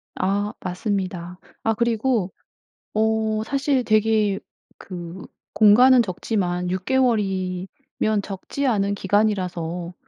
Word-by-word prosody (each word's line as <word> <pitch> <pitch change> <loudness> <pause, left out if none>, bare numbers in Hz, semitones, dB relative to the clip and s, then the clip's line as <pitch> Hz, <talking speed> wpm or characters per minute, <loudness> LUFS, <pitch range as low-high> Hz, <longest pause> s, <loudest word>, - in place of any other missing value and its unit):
아 205 +2 -1
맞습니다. 180 -2 -3 0.2
아 225 - +2
그리고 230 -3 0 0.6
어 220 0 +1
사실 275 0 0
되게 215 -2 +2 0.4
그 175 0 -8 0.3
공간은 245 +4 +6
적지만 180 -3 -2
6 185 0 -2
개월이면 205 -4 0
적지 205 +8 -4
않은 200 -4 +1
기간이라서 180 -4 -1
205 Hz, 205 characters per minute, -23 LUFS, 185-225 Hz, 0.6 s, 공간은